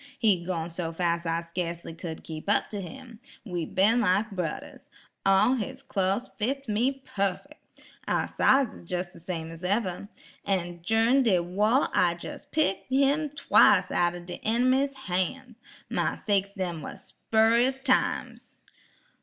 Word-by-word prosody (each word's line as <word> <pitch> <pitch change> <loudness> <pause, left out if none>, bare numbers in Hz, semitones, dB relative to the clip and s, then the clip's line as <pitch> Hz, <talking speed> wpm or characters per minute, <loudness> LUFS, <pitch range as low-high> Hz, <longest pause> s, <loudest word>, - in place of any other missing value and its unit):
He 195 -6 +2
goin' 170 -2 -3
so 165 -1 -4
fas' 170 0 -1
I 165 0 0
skacely 170 -1 -5
cud 165 -2 -7
keep 160 +4 -7
up 205 - +2
tuh 205 -2 -4
him. 235 +3 -10 0.3
We 175 -6 -3
bin 215 +8 +3
like 210 +2 +2
brudders. 180 -5 -5 0.4
All 195 +6 +5
his 260 +2 -4
clo's 200 0 -1
fits 270 +5 -2
me 255 +6 0
puffick! 200 - -3 0.5
Our - - +1
size 270 -3 +3
is 170 - -14
jes' 180 -1 -3
de - - -13
same 165 -1 -5
as 165 +2 -11
ever. 195 0 -1 0.3
En 175 -3 -2
jurin' 225 +8 +3
de 220 -8 +3
wah 210 +9 +2
I 175 -2 +2
jes' 285 +9 -8
picked 300 -11 -1
him 280 +3 +2
twice 285 0 +4
outen 175 0 0
de 175 - -7
inimy's 255 +5 +2
han's; 215 +7 -2 0.3
my - - -1
sakes 200 -1 0
dem 175 -4 -3
was - - -9
spurious 235 +4 +2
times. 260 -2 0
200 Hz, 150 wpm, -27 LUFS, 175-250 Hz, 0.5 s, All